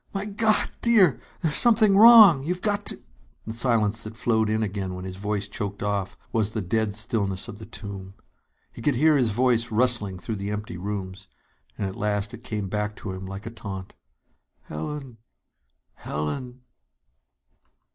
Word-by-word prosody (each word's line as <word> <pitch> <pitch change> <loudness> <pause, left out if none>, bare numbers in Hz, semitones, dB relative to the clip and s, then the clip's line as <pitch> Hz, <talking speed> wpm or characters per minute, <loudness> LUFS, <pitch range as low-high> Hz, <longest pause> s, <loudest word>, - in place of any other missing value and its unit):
My 195 +1 -2
God, 215 +1 +1
dear, 210 - +4 0.2
there's 160 -4 0
something 220 -4 +5
wrong! 215 - +9
You've 180 +4 -3
got 205 -1 0
to - - -5 0.2
" - - -36
The 110 - -5
silence 115 -2 +2
that 110 +1 -8
flowed 110 -2 +1
in 110 0 0
again 95 -2 -3
when 90 0 -7
his 95 0 -6
voice 105 0 -2
choked 100 -1 -5
off 100 -1 -2 0.2
was 110 -2 +1
the 110 - -2
dead 105 +2 -1
stillness 105 -3 -1
of 105 - -9
the 110 - -10
tomb. 95 -2 -8 0.6
He - - -10
could 140 +3 +1
hear 155 +5 +4
his 125 -5 +3
voice 120 +1 +1
rustling 110 -4 +1
through 110 +4 -5
the 100 +1 -4
empty 105 -2 -5
rooms, 95 0 -5 0.5
and 100 - -2
at 95 - -6
last 105 +1 -2
it 120 0 -10
came 105 -5 -4
back 105 +1 -2
to 105 - -6
him 95 0 -7
like 95 +2 -8
a 115 - -6
taunt: 95 -4 -8 0.8
"_Helen! 130 - -6 0.8
Helen! 125 - -5
110 Hz, 170 wpm, -25 LUFS, 100-125 Hz, 0.8 s, wrong